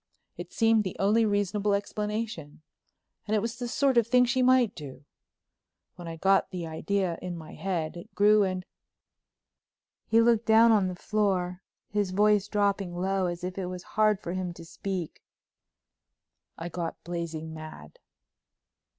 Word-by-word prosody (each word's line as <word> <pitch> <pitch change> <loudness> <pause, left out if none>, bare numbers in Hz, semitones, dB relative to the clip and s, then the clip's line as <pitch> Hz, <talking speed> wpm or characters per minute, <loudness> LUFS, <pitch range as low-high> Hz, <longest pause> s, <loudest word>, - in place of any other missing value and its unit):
It - - -8
seemed 225 -2 +3
the 185 - -5
only 215 +3 +3
reasonable 205 0 +1
explanation—and 210 -2 -6
it - - +3
was 230 +3 -4
the 245 - -3
sort 265 0 +3
of 230 - 0
thing 250 +1 +5
she 245 +2 +1
might 255 -4 +4
do. 145 -2 -10 0.9
When 175 -1 -9
I 165 - -5
got 195 +4 +2
the 180 -3 -5
idea 175 +2 -2
in 180 -1 -5
my 160 -1 -10
head 175 -5 -3
it 175 - -11
grew 210 +1 +5
and," 185 -2 -1 1.4
he 225 - +4
looked 230 -1 +3
down 225 +1 +6
on 205 -4 +3
the 180 - -4
floor, 190 -3 -1 0.3
his 205 -1 -1
voice 205 +1 +3
dropping 200 -4 0
low 190 0 0
as 175 0 -5
if 185 +1 -4
it 185 - -3
was 180 0 -6
hard 215 -2 +3
for 175 - -5
him 185 -2 -3
to 165 - -11
speak, 180 -1 -5 1.4
"I 165 - -5
got 170 -1 -5
blazing 165 -2 -5
mad." 155 - -10
195 Hz, 155 wpm, -28 LUFS, 175-215 Hz, 1.4 s, down